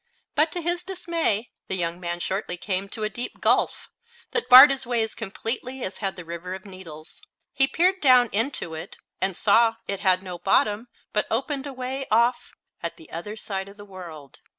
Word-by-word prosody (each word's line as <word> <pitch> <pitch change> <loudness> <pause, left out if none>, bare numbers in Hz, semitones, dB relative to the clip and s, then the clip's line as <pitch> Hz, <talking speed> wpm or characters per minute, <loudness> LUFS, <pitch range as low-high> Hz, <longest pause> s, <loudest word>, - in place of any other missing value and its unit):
But, 305 +2 +2
to 350 - -3
his 345 +1 -1
dismay, 340 - -2 0.2
the 190 - 0
young 170 -1 -1
man 175 -1 -4
shortly 185 0 -3
came 195 +1 -3
to 215 +1 -4
a - - +1
deep 240 +3 -5
gulf, - - +1 0.4
that 470 - 0
barred 260 +3 +11
his 265 -2 -1
way 240 -2 +1
as 220 - -5
completely 240 +4 -5
as 190 - -5
had 195 -2 -1
the 175 - -9
River 170 +2 -6
of 190 - -11
Needles. 170 - -11 0.3
He 270 0 +4
peered 365 +6 +1
down 255 -3 +6
into 220 - 0
it 160 - -8 0.2
and 190 -1 0
saw 225 +2 +4
it 200 -1 -2
had 185 -2 +3
no 180 -2 -7
bottom, 205 +5 +1 0.3
but 210 - +1
opened 270 +4 -2
away 265 0 -5
off 235 +3 +1 0.3
at 170 - -5
the 160 - -16
other 190 +6 -6
side 195 -2 -4
of 200 - -15
the 205 - -11
world. 170 -8 -11
210 Hz, 195 wpm, -24 LUFS, 185-260 Hz, 0.4 s, barred